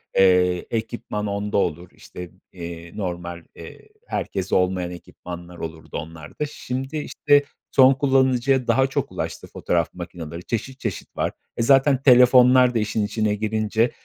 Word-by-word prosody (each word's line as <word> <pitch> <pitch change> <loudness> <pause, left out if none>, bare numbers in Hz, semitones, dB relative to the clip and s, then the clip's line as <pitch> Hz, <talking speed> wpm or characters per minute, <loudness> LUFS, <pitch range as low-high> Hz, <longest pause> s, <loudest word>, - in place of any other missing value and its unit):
eee, 90 -2 +4
ekipman 110 -2 -3
onda 100 +1 -2
olur, 85 -2 -1
işte, 90 -1 -10 0.2
eee, 85 -1 -8
normal, 85 -3 -5
eee, 435 - -12 0.2
herkeste 95 -1 -2
olmayan 90 -1 +1
ekipmanlar 90 0 -10
olurdu 80 -1 -7
onlarda. 80 - -6
Şimdi, 135 0 -5
işte, 145 -1 +2 0.3
son 130 0 +6
kullanıcıya 130 -1 +2
daha 130 +3 +3
çok - - -3
ulaştı - - -5
fotoğraf 85 -2 -1
makinaları 85 -2 -8
çeşit 125 +6 -4
çeşit 110 -8 -5
var. - - 0 0.3
E, - - 0
zaten 135 +1 +4
telefonlar 125 -1 +6
da - - +3
işin 105 0 -1
içine 105 0 0
girince, 110 +2 0
105 Hz, 135 wpm, -23 LUFS, 90-125 Hz, 0.3 s, son